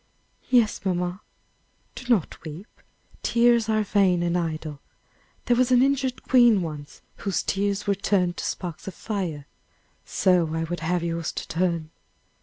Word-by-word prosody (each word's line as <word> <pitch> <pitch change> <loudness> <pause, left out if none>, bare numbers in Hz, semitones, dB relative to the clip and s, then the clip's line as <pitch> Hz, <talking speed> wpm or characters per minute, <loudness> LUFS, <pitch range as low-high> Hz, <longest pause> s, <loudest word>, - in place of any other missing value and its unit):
"Yes, 240 -4 +3
mamma." 180 0 -2 0.7
"Do 255 - -10
not 205 -9 0
weep; 160 +4 -8 0.6
tears 235 -1 +3
are 215 -1 +2
vain 190 -4 +2
and 170 0 0
idle. 155 -4 -3 0.7
There 245 - +3
was 250 +1 +2
an 250 0 +6
injured 270 -2 0
queen 240 -7 +5
once 150 -3 -8
whose 195 -2 -2
tears 200 0 -1
were 200 - +2
turned 185 -2 0
to - - -4
sparks 175 -1 -5
of 190 - -6
fire. 180 -9 -4 0.6
So 175 -4 +2
I 165 - -1
would 175 +2 -4
have 175 +1 -1
yours 165 -1 -2
to - - -5
turn! 170 -2 -1
185 Hz, 150 wpm, -25 LUFS, 165-215 Hz, 0.7 s, an